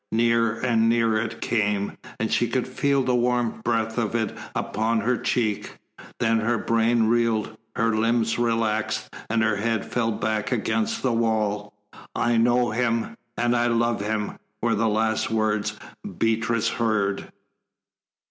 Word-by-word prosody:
Nearer 115 0 +3
and 115 -2 +2
nearer 115 -2 +2
it 115 0 -5
came, 105 -3 0 0.2
and 110 - -1
she 120 - +2
could 125 +2 -1
feel 140 +1 +1
the 130 0 +1
warm 120 -2 +1
breath 115 0 0
of 115 -1 -1
it 110 -3 -1 0.2
upon 110 +1 0
her 125 +4 +1
cheek. 110 -4 -1 0.4
Then 115 0 +2
her 115 +2 +1
brain 115 +1 +2
reeled, 110 -1 +1 0.2
her 115 -1 +1
limbs 115 +1 +1
relaxed, 115 -2 0 0.2
and 110 0 +2
her 110 -2 +1
head 110 0 -1
fell 115 -2 0
back 110 0 -2
against 225 0 -1
the 130 -3 +2
wall. 105 -3 0 0.4
"I 120 0 +2
know 120 +1 +3
him, 115 0 0 0.2
and 120 0 +2
I 120 0 +2
love 115 -2 +1
him," 105 0 -2 0.2
were 115 0 +1
the 110 +1 +1
last 110 +1 +1
words 110 -1 0 0.4
Beatrice 115 0 +1
heard. 105 -4 -1
115 Hz, 150 wpm, -24 LUFS, 110-120 Hz, 0.4 s, Nearer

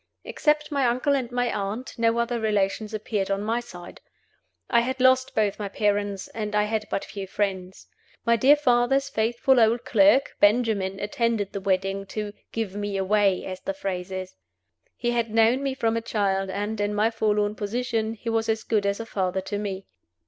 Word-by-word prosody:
Except 300 0 0
my 280 -3 +2
uncle 255 +4 +1
and 250 -3 -2
my 245 -1 0
aunt, 205 +6 -4
no 230 0 +2
other 235 0 0
relations 210 0 0
appeared 215 -2 -2
on 195 +1 -1
my 225 +3 0
side. 180 -7 -11 0.7
I 235 - +4
had 260 +3 -2
lost 260 0 +3
both 210 -2 +1
my 205 -1 -3
parents, 205 -1 -1
and 210 -2 -4
I 210 - +4
had 215 0 -2
but - - -2
few 195 -1 -7
friends. 190 -2 -3 0.4
My 235 - +4
dear 265 +6 +6
father's 270 0 +2
faithful 240 +2 +2
old 230 +1 +3
clerk, 290 -2 +4
Benjamin, 205 -3 +2
attended 210 -1 -1
the 200 - -4
wedding 195 0 -1
to 210 0 -5 0.2
"give 220 -4 -3
me 205 -1 -3
away," 195 -1 +2
as 185 -1 -6
the 195 - -4
phrase 185 -2 -4
is. 185 0 -5 0.6
He 240 0 -1
had 235 -1 0
known 225 +4 +3
me 275 -1 -2
from 230 -3 0
a 230 - -1
child, 195 -4 -1
and, 205 +2 -3
in 205 0 -1
my 215 +2 +2
forlorn 210 -2 +1
position, 225 +1 -2
he 230 - -13
was 225 0 0
as 220 0 0
good 210 -3 0
as 200 +2 -1
a 230 - -4
father 190 -3 -1
to 200 +2 -4
me. 195 -2 -4
215 Hz, 190 wpm, -25 LUFS, 200-235 Hz, 0.7 s, dear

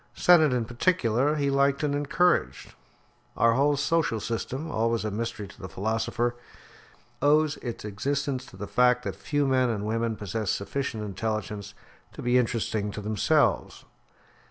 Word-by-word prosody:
Sennett, 160 -5 +5
in 125 -2 0
particular, 125 - +1
he 140 -2 0
liked 140 +1 +2
and 145 -1 +1
encouraged. 150 +5 +1 0.6
Our 115 0 +4
whole 140 +3 +2
social 145 -5 +1
system, 130 +8 -4
always 115 -1 0
a 105 - -2
mystery 105 -1 -4
to - - -15
the 95 - -7
philosopher, 115 +4 -1 0.9
owes 150 +1 +3
its 120 -3 -6
existence 130 +5 -2
to - - -14
the 105 - -5
fact 125 +2 +3
that - - -4
few 145 -1 -1
men 130 -2 +2
and 105 -3 -2
women 115 +1 -1
possess 105 0 -4
sufficient 110 +1 -2
intelligence 105 0 -4 0.4
to - - -8
be 125 +1 +3
interesting 110 -3 -1
to 105 - -5
themselves. 110 +9 +1
120 Hz, 150 wpm, -27 LUFS, 110-140 Hz, 0.9 s, Sennett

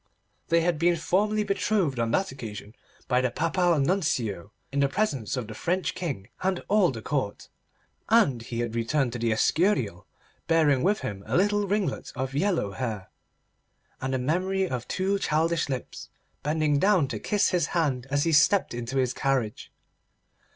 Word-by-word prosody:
They 170 0 +3
had 165 -2 0
been 175 +1 +3
formally 210 +6 +1
betrothed 195 - 0
on 115 -1 +1
that 190 +9 0
occasion 110 -5 -8 0.3
by 125 0 +2
the 130 - +1
Papal 165 +5 +1
Nuncio 125 - 0 0.2
in 140 - -1
the 140 -1 +3
presence 140 - -1
of 125 - -2
the 110 - -8
French 180 - -1
King 140 - -4
and 185 -1 -1
all 205 -4 +4
the 115 -5 -6
Court, 130 -9 -3 0.6
and 210 - +4
he 115 0 -4
had 120 -2 -3
returned 120 +2 0
to 120 - -4
the 115 0 +1
Escurial 115 - +1 0.4
bearing 155 -5 +3
with 205 +4 +1
him 100 -1 -5
a - - +1
little 205 +2 +2
ringlet 195 -6 -1
of 130 +1 -3
yellow 165 - 0
hair, 110 -4 -5 0.9
and 130 0 -1
the - - +1
memory 185 +8 0
of 125 -6 -4
two 195 +2 0
childish 165 -1 +1
lips 130 -3 -5 0.3
bending 150 -1 +1
down 190 -6 +3
to 110 -5 -4
kiss 205 - +1
his 175 -4 +1
hand 135 -6 0
as 145 +1 +1
he 165 - +1
stepped 170 +4 +4
into 120 +2 -4
his 130 -1 +1
carriage. 130 -6 -1
145 Hz, 170 wpm, -26 LUFS, 125-185 Hz, 0.9 s, all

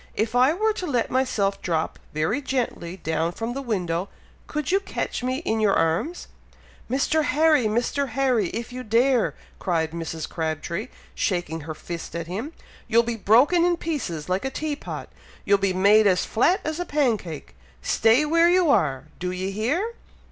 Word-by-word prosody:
If 220 +2 -1
I 250 +3 +5
were 430 +6 +1
to 370 -4 -4
let 245 -6 0
myself 220 -7 0
drop 160 -2 -1
very 160 - 0
gently 235 -10 -3
down 165 0 -1
from 230 +4 -4
the 275 - -4
window, 185 -7 -2 0.4
could 300 +1 -2
you 390 - +4
catch 395 - -4
me 255 +5 -2
in 220 0 0
your 210 -2 +3
arms?" 170 - 0 0.6
"Mr. 285 +4 +1
Harry! 300 -2 +3
Mr. 240 +5 0
Harry! 250 -5 +1
if 235 +4 -5
you 255 - -5
dare!" 245 +2 +2 0.2
cried 165 -4 0
Mrs. 165 -1 -5
Crabtree, 160 - -3 0.3
shaking 175 -4 -1
her 155 +1 -6
fist 170 +2 -7
at 170 0 -3
him. 210 - -5 0.4
"You'll 230 +1 +4
be 235 0 -2
broken 245 - +4
in 350 0 +2
pieces 225 - -3
like 185 +1 0
a 270 - -1
tea 300 +2 -3
pot, - - -7 0.4
you'll 200 0 +4
be 195 -1 +1
made 200 +3 +5
as 185 -2 +2
flat 345 - +2
as 315 +2 -3
a 355 - -2
pancake! 230 - -1 0.3
Stay 230 +7 +4
where 335 +3 +4
you 355 -4 +4
are! 140 - +2 0.2
Do 180 - -2
ye 185 +1 -3
hear!" 290 - -1
225 Hz, 175 wpm, -24 LUFS, 180-285 Hz, 0.6 s, I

